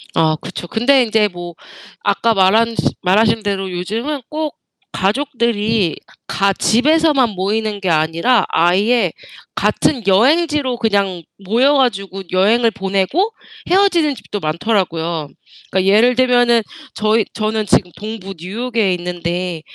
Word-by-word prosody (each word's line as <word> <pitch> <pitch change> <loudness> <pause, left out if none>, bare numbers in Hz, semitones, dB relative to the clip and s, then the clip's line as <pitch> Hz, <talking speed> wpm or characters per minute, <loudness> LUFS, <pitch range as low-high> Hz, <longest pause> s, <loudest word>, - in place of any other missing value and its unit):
아 160 -1 +2
그쵸. 175 - -7
근데 250 +6 +3
인제 220 -2 +2
뭐 175 -2 -8 0.5
아까 210 +3 +1
말한 220 +4 +3 0.3
말하신 215 +4 +2
대로 195 -2 -2
요즘은 225 +11 -4
꼭 310 -1 -4 0.4
가족들이 225 - 0 0.3
가 195 +4 +1
집에서만 285 +3 +2
모이는 205 +2 -2
게 190 -2 -2
아니라 165 +9 +2
아예 190 +4 +2 0.4
같은 265 -6 0
여행지로 275 - +2
그냥 200 -6 0 0.2
모여 245 +8 +3
가지고 195 -8 -1
여행을 225 +5 +3
보내고 195 - -1 0.4
헤어지는 350 -6 +3
집도 210 - -7
많더라고요. 165 -3 -2 0.4
그러니까 190 +1 +2
예를 240 +4 +4
들면은 245 -2 +3 0.3
저희 215 0 +1
저는 215 -1 -2
지금 180 -2 +2
동부 210 -2 -7
뉴욕에 220 +3 -1
있는데 175 -1 -4
215 Hz, 280 characters per minute, -17 LUFS, 185-245 Hz, 0.5 s, 예를